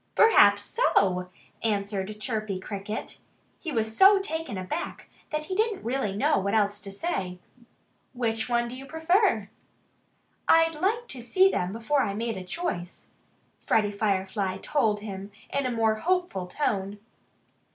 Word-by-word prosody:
"Perhaps 450 0 +6
so!" 185 - +1 0.3
answered 205 -1 -2
Chirpy 215 -4 -2
Cricket. 200 +2 -5 0.4
He 330 - -5
was 220 -4 -1
so 390 - +8
taken 325 - -3
aback 185 - -5 0.2
that 305 0 -2
he 375 - -5 0.2
really 265 - -2
didn't 195 0 -4
know 205 - +3
what 200 +3 0
else 205 -1 +2
to 200 - -7
say. 195 - -3 0.8
"Which 225 -2 -1
one 240 0 +1
do 240 - -7
you 270 +1 -9
prefer?" 320 - +2 1.0
"I'd 325 0 +5
have 410 +10 0
to 250 - -7
see 375 +11 +4
them 180 +1 -1
before 230 +7 0
I 200 -6 -1
made 230 +1 -2
a 190 - -6
choice," 180 - -4 0.5
Freddie 210 -2 +1
Firefly 195 -2 -1
told 220 -8 +1
him 200 -1 -7 0.2
in 280 -2 +1
a - - -2
more 225 -2 +2
hopeful 350 - -1
tone. 200 -3 -2
220 Hz, 145 wpm, -27 LUFS, 200-305 Hz, 1.0 s, so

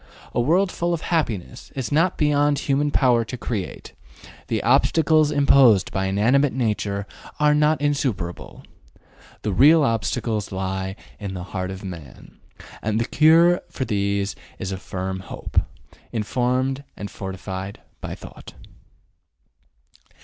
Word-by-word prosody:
A - - +1
world 180 +9 +2
full 170 0 -1
of 160 - -7
happiness 110 - -2
is 130 -1 -3
not 165 +5 +2
beyond 145 -1 +2
human 145 +1 +1
power 125 -5 +3
to 125 +3 -7
create; 110 -5 -5 0.5
the - - -1
obstacles 155 -2 +4
imposed 140 -8 +5
by 95 0 -1
inanimate 125 +9 +2
nature 105 -5 -1 0.3
are 150 0 +4
not 150 +1 +3
insuperable. 130 -12 -2 0.8
The 105 - -1
real 150 - +6
obstacles 110 -2 -1
lie 95 0 -3 0.2
in 100 -2 -5
the 90 - -5
heart 90 -1 -2
of 95 +1 -7
man, 85 -8 -10 0.4
and 110 +1 0
the 115 - 0
cure 165 +5 +5
for 130 - -3
these 100 -2 -1 0.2
is 95 - -4
a 95 - -3
firm 95 0 -4
hope, 95 - -2 0.5
informed 125 +4 -1
and 100 - -6
fortified 95 0 -6 0.2
by - - -5
thought. - - -12
115 Hz, 130 wpm, -23 LUFS, 95-145 Hz, 0.8 s, real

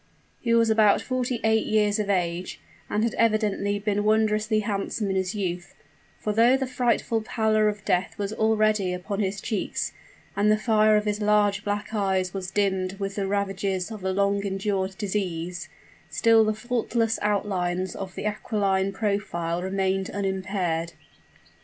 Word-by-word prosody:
He 235 - -2
was 230 -1 +4
about 215 -2 +5
forty 255 -2 -2
eight 220 0 +2
years 210 -1 +2
of 205 -1 -2
age, 180 -2 -1 0.3
and 210 - 0
had 230 - 0
evidently 210 -2 +1
been 205 0 -1
wondrously 215 0 +2
handsome 200 0 -2
in - - -1
his 190 +2 -1
youth: 180 -3 -4 0.4
for 210 - -2
though 235 +4 +5
the 265 - -1
frightful 245 -2 0
pallor 215 -1 +2
of 210 0 -6
death 180 +2 0
was 205 0 -3
already 215 -3 +2
upon 195 +3 -4
his 195 -1 -1
cheeks, 215 0 -2 0.4
and 205 +1 +2
the 215 - +4
fire 215 -1 +4
of 210 - -1
his 210 0 -1
large 205 -1 +2
black 205 +1 -3
eyes 190 -3 0
was 190 -2 -4
dimmed 190 -2 0
with 195 0 -3
the 195 -1 -2
ravages 195 -1 -1
of 215 -4 -8
a 190 - 0
long 200 +1 +1
endured 195 -1 -2
disease, 180 -4 -3 0.4
still 225 -1 +4
the 215 0 0
faultless 230 -1 -1
outlines 185 -3 -1
of 190 -2 -7
the - - -5
aquiline 200 -2 0
profile 190 -5 -2
remained 190 0 -1
unimpaired. 190 -4 -2
205 Hz, 160 wpm, -25 LUFS, 190-215 Hz, 0.4 s, about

